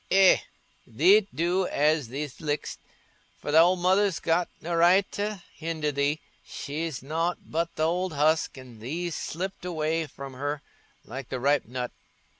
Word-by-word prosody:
"Eh, 190 Hz, -1 st, +7 dB, 0.5 s
thee't 190 Hz, -, +5 dB
do 175 Hz, +4 st, +1 dB
as 150 Hz, -2 st, +2 dB
thee 140 Hz, +5 st, -3 dB
lik'st, 150 Hz, -2 st, -3 dB, 0.6 s
for 145 Hz, -, -4 dB
thy 160 Hz, -, +7 dB
old 180 Hz, +3 st, +6 dB
mother's 190 Hz, +1 st, +2 dB
got 170 Hz, +1 st, +1 dB
no 170 Hz, +2 st, -4 dB
right 175 Hz, +4 st, +5 dB
t' 210 Hz, +1 st, -2 dB, 0.2 s
hinder 160 Hz, -2 st, -2 dB
thee. 140 Hz, +2 st, 0 dB, 0.2 s
She's 150 Hz, -1 st, -5 dB
nought 165 Hz, +5 st, -1 dB
but 165 Hz, +2 st, -2 dB
th' -, -, -4 dB
old 175 Hz, +2 st, +1 dB
husk, 155 Hz, +1 st, +2 dB
and 125 Hz, -4 st, -12 dB
thee'st 165 Hz, +8 st, -3 dB
slipped 190 Hz, +4 st, -4 dB
away 160 Hz, -2 st, -1 dB
from 135 Hz, -2 st, -9 dB
her, 145 Hz, +2 st, -3 dB, 0.4 s
like 130 Hz, +2 st, -7 dB
the 130 Hz, -, -3 dB
ripe 140 Hz, +1 st, +2 dB
nut." 125 Hz, 0 st, -4 dB
160 Hz, 155 wpm, -27 LUFS, 145-175 Hz, 0.6 s, Eh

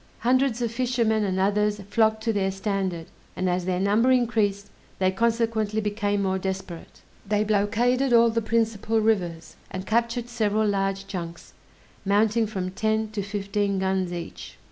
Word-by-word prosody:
Hundreds 250 Hz, 0 st, +2 dB
of 230 Hz, -, -1 dB
fishermen 230 Hz, -3 st, +1 dB
and 190 Hz, -2 st, -1 dB
others 210 Hz, +2 st, +1 dB
flocked 220 Hz, 0 st, +2 dB
to 225 Hz, -1 st, +1 dB
their 195 Hz, -2 st, +1 dB
standard; 190 Hz, -3 st, -2 dB, 0.3 s
and 185 Hz, -, -1 dB
as 180 Hz, 0 st, 0 dB
their 180 Hz, -1 st, 0 dB
number 210 Hz, +6 st, +3 dB
increased 220 Hz, -5 st, +1 dB, 0.3 s
they 185 Hz, -1 st, +2 dB
consequently 225 Hz, 0 st, 0 dB
became 205 Hz, -1 st, -1 dB
more 190 Hz, 0 st, 0 dB
desperate. 190 Hz, -3 st, -6 dB, 0.2 s
They 210 Hz, +1 st, +1 dB
blockaded 230 Hz, +5 st, +1 dB
all 235 Hz, -1 st, +6 dB
the 230 Hz, +1 st, 0 dB
principal 225 Hz, 0 st, 0 dB
rivers, 175 Hz, -7 st, -1 dB
and 185 Hz, 0 st, -6 dB
captured 235 Hz, +2 st, 0 dB
several 215 Hz, -3 st, 0 dB
large 195 Hz, -1 st, -1 dB
junks, 170 Hz, -3 st, -7 dB, 0.5 s
mounting 215 Hz, +3 st, +2 dB
from 185 Hz, -3 st, -4 dB
ten 220 Hz, +2 st, -1 dB
to 210 Hz, -1 st, -3 dB
fifteen 200 Hz, 0 st, -2 dB
guns 190 Hz, -1 st, 0 dB
each. 175 Hz, -1 st, -7 dB
210 Hz, 150 wpm, -25 LUFS, 195-225 Hz, 0.5 s, all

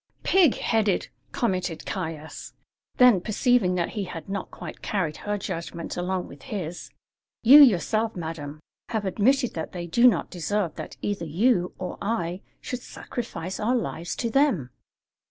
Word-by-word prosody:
"Pig 360 Hz, -9 st, +5 dB
headed!" 215 Hz, -4 st, +1 dB, 0.2 s
commented 185 Hz, -7 st, -1 dB
Caius. 160 Hz, -4 st, -5 dB, 0.4 s
Then, 245 Hz, -7 st, +6 dB
perceiving 215 Hz, -2 st, +2 dB
that 175 Hz, -1 st, 0 dB
he 205 Hz, -3 st, -3 dB
had 165 Hz, -2 st, -8 dB
not 195 Hz, -1 st, -4 dB
quite -, -, -9 dB
carried 180 Hz, -7 st, -1 dB
her 205 Hz, 0 st, -2 dB
judgment 170 Hz, -3 st, -5 dB
along 180 Hz, +1 st, -2 dB
with -, -, -13 dB
his: 180 Hz, -8 st, -5 dB, 0.5 s
"You 275 Hz, +6 st, +10 dB
yourself, 225 Hz, -2 st, +4 dB
madam, 155 Hz, -3 st, -6 dB, 0.3 s
have 220 Hz, -3 st, -2 dB
admitted 245 Hz, +6 st, +2 dB
that 160 Hz, -, -5 dB
they 175 Hz, -1 st, -4 dB
do 235 Hz, +9 st, +5 dB
not 245 Hz, -, +2 dB
deserve 180 Hz, +1 st, -1 dB
that -, -, -8 dB
either 200 Hz, -4 st, -2 dB
you 180 Hz, +2 st, +2 dB
or 180 Hz, -1 st, -6 dB
I 195 Hz, -4 st, -2 dB, 0.2 s
should 250 Hz, -1 st, -5 dB
sacrifice 190 Hz, -8 st, -6 dB
our 235 Hz, +4 st, +1 dB
lives 170 Hz, -8 st, -3 dB
to 230 Hz, -, -2 dB
them." 235 Hz, -, +2 dB
190 Hz, 150 wpm, -26 LUFS, 170-230 Hz, 0.5 s, You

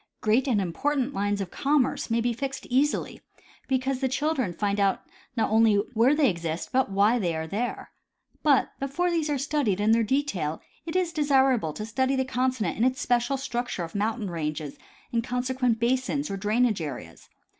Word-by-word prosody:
Great 225 Hz, +6 st, +2 dB
and 235 Hz, -6 st, +2 dB
important 265 Hz, -, -1 dB
lines 205 Hz, 0 st, -1 dB
of 190 Hz, -, -5 dB
com 285 Hz, -1 st, +2 dB
merce -, -, -4 dB
may 230 Hz, +1 st, +2 dB
be 240 Hz, +1 st, 0 dB
fixed 270 Hz, +3 st, -5 dB
easily, 280 Hz, +4 st, +1 dB, 0.5 s
because 265 Hz, 0 st, 0 dB
the 265 Hz, -1 st, 0 dB
children 275 Hz, -, 0 dB
find 200 Hz, +3 st, -1 dB
out 195 Hz, -1 st, +1 dB, 0.3 s
not 225 Hz, -, +1 dB
only 220 Hz, -1 st, +5 dB, 0.2 s
where 240 Hz, +6 st, +4 dB
they 295 Hz, -2 st, +4 dB
exist 170 Hz, -4 st, -3 dB
but 260 Hz, -3 st, +2 dB
why 205 Hz, +5 st, +3 dB
they 175 Hz, -5 st, -1 dB
are 160 Hz, 0 st, -3 dB
there. 210 Hz, +9 st, -4 dB, 0.5 s
But 285 Hz, -4 st, +3 dB
before 310 Hz, +7 st, -1 dB
these 325 Hz, -3 st, 0 dB
are 290 Hz, -, +1 dB
studied 275 Hz, -8 st, 0 dB
in 210 Hz, +1 st, +3 dB
their 230 Hz, +1 st, +4 dB
detail 210 Hz, -, -1 dB, 0.3 s
it 320 Hz, -, -4 dB
is 360 Hz, -2 st, +1 dB
desirable 270 Hz, -, +3 dB
to 215 Hz, -, -5 dB
study 260 Hz, +4 st, 0 dB
the 265 Hz, 0 st, 0 dB
continent 255 Hz, -3 st, -1 dB
in 225 Hz, -, +1 dB
its 255 Hz, +1 st, +2 dB
special 245 Hz, +2 st, +1 dB
structure 245 Hz, -7 st, -3 dB
of 165 Hz, -, -7 dB
mountain 210 Hz, -1 st, -1 dB
ranges 155 Hz, -3 st, -4 dB, 0.4 s
and 230 Hz, -1 st, +1 dB
consequent 250 Hz, -1 st, 0 dB
basins 260 Hz, +3 st, 0 dB
or -, -, -2 dB
drainage 215 Hz, 0 st, +1 dB
areas. 125 Hz, -, -7 dB
245 Hz, 185 wpm, -26 LUFS, 205-270 Hz, 0.5 s, only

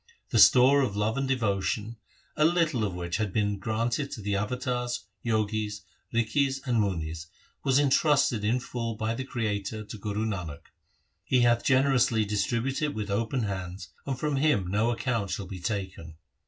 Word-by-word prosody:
The -, -, +3 dB
store 135 Hz, +3 st, +7 dB
of 120 Hz, -7 st, -1 dB
love 105 Hz, +2 st, 0 dB
and 135 Hz, 0 st, -1 dB
devotion, 110 Hz, -3 st, -1 dB, 0.4 s
a 150 Hz, -, +2 dB
little 160 Hz, -7 st, +2 dB
of 100 Hz, -4 st, -2 dB
which 85 Hz, -1 st, -3 dB
had 105 Hz, -3 st, -1 dB
been 105 Hz, -1 st, 0 dB
granted 115 Hz, +7 st, -1 dB
to 110 Hz, -, -6 dB
the 100 Hz, 0 st, 0 dB
avatars, 125 Hz, +3 st, -2 dB, 0.2 s
jogis, 110 Hz, -2 st, -1 dB, 0.3 s
rikhis, 135 Hz, +4 st, +1 dB
and 120 Hz, -3 st, +1 dB
munis, 80 Hz, -4 st, -3 dB, 0.4 s
was 135 Hz, -1 st, +3 dB
entrusted 140 Hz, -4 st, +3 dB
in 115 Hz, +4 st, +2 dB
full 115 Hz, -2 st, -4 dB
by 110 Hz, +1 st, -1 dB
the 130 Hz, -, -4 dB
Creator 110 Hz, -3 st, -3 dB
to 105 Hz, -, -9 dB
Guru 105 Hz, +1 st, -2 dB
Nanak. 90 Hz, -9 st, -5 dB, 0.5 s
He 125 Hz, +5 st, +2 dB
hath 120 Hz, -1 st, +3 dB
generously 130 Hz, -4 st, +3 dB
distributed 115 Hz, +7 st, -1 dB
it 150 Hz, -, -3 dB
with 105 Hz, -2 st, -3 dB
open 115 Hz, +4 st, 0 dB
hands 95 Hz, -2 st, -5 dB, 0.2 s
and 135 Hz, -2 st, -1 dB
from 150 Hz, +1 st, -1 dB
him 145 Hz, -9 st, +2 dB
no 110 Hz, +4 st, +2 dB
account 115 Hz, -4 st, -1 dB
shall 90 Hz, +2 st, -3 dB
be 95 Hz, 0 st, -7 dB
taken. 95 Hz, -4 st, -4 dB
110 Hz, 170 wpm, -28 LUFS, 100-130 Hz, 0.5 s, store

